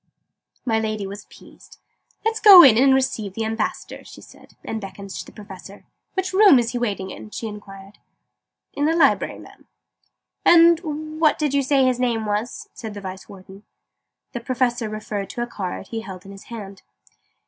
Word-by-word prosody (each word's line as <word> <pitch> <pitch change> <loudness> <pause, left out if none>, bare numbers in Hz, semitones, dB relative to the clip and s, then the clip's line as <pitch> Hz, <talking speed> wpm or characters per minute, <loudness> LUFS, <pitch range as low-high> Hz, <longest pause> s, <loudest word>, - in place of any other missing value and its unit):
My 225 -3 +1
Lady 215 -2 -3
was 200 +1 -9
appeased. - - -18 0.5
"Let's 445 0 0
go 390 -5 +10
in 255 -6 +7
and 265 +4 +4
receive 255 -7 0
the 225 - -2
Ambassador," 225 +1 -4
she - - -13
said, - - -18
and 220 - -4
beckoned 195 0 -9
to - - -6
the - - -13
Professor. 200 -1 -12 0.3
"Which 375 -1 -2
room 390 -7 +7
is 235 -1 0
he 245 - -3
waiting 200 -5 -3
in?" - - -10
she 225 - -7
inquired. 200 -2 -10 0.7
"In 290 - -1
the 325 +2 +2
Library, 335 - +2
Madam." - - -16 0.8
"And 320 -2 +3
what 310 -2 +3
did 300 -3 -1
you 280 - +2
say 270 0 +2
his 255 -1 +1
name 235 -3 -1
was?" 210 +4 -3
said 220 -3 -8
the 205 - -7
Vice 190 0 -9
Warden. 190 0 -13 0.7
The 240 - -5
Professor 240 -2 -1
referred 210 -2 -5
to 240 -3 -4
a - - -2
card 195 -5 -6
he 225 -1 -4
held 190 -4 -10
in 195 - -11
his 195 0 -13
hand. 200 -4 -9
225 Hz, 180 wpm, -22 LUFS, 200-270 Hz, 0.8 s, go